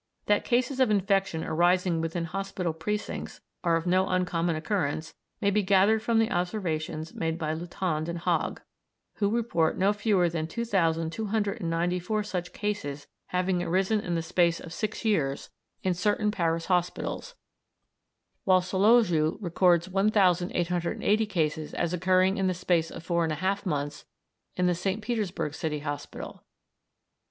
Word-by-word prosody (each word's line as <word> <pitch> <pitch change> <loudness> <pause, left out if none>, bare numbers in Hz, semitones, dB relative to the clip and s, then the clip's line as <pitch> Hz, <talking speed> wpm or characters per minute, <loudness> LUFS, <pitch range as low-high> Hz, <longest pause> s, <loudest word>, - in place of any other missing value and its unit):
That 205 0 +2
cases 255 +2 0
of 260 - +4
infection 195 -4 +1
arising 175 0 +2
within 165 +1 -2
hospital 185 -1 -3
precincts 205 +7 -4 0.2
are 170 -2 +3
of 165 +1 -1
no 185 +1 +3
uncommon 175 -2 0
occurrence 155 -3 -2 0.3
may 200 - +3
be 210 +1 +2
gathered 200 +3 +4
from 230 0 +1
the 225 +1 +2
observations 165 -5 -2
made 165 0 -2
by 155 -2 -2
Lutand 165 -1 -2
and 170 - -3
Hogg, 170 - -1 0.6
who 200 -1 +2
report 215 -8 +1
no 195 +2 +3
fewer 205 -4 +2
than 165 -1 -2
2,294 180 0 -1
such 180 -3 -4
cases 150 -9 -3 0.2
having 180 0 0
arisen 190 +5 +1
in 175 -4 -2
the 165 - -1
space 170 0 +2
of 165 - -9
six 215 +3 -4
years 150 -11 0 0.3
in 185 - +2
certain 210 +4 +1
Paris 165 -4 0
hospitals, 180 - -1 1.1
whilst 185 -1 +3
Solowjew 190 -6 +4
records 175 -2 +3
1,880 185 0 +2
cases 155 -5 -1
as 170 0 -1
occurring 185 +2 +3
in 190 - +1
the 185 - 0
space 170 -2 +1
of 165 - -9
four 170 0 +1
and 160 -1 0
a - - -2
half 190 +5 -1
months 145 -2 -3 0.5
in 180 - +1
the 180 - +3
St. 190 +4 -2
Petersburg 205 -9 -2
city 150 -1 -3
hospital. 145 -1 -6
180 Hz, 145 wpm, -28 LUFS, 165-200 Hz, 1.1 s, of